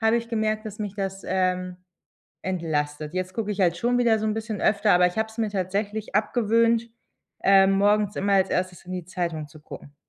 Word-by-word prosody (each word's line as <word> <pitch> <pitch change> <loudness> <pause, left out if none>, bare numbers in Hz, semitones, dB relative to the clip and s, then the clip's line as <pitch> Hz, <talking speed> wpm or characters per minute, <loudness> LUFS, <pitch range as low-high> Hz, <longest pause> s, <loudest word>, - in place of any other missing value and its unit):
habe 225 +1 +3
ich 235 0 -3
gemerkt, 215 -1 -1
dass 215 -1 -8
mich 205 -2 -4
das, 195 -1 -4
ähm, 185 -1 0 0.7
entlastet. 155 -4 -2
Jetzt 185 0 -3
gucke 215 -2 -2
ich 200 - -4
halt 175 -2 +3
schon 245 +5 +1
wieder 230 -3 +3
so 220 - -2
'n 215 - 0
bisschen 220 -1 -4
öfter, 205 +1 +3
aber 180 0 +5
ich 180 - -3
habe 220 0 0
es 220 +1 -16
mir 220 -2 +1
tatsächlich 200 +3 -3
abgewöhnt, 230 +1 +2 0.5
ähm, 195 0 +6
morgens 205 +1 +2
immer 200 +1 0
als 190 0 +3
erstes 180 -1 -2
in 185 - -8
die 180 -2 -4
Zeitung 170 -4 -3
zu 155 0 -16
gucken. 145 -1 -11
195 Hz, 210 wpm, -25 LUFS, 180-220 Hz, 0.7 s, ähm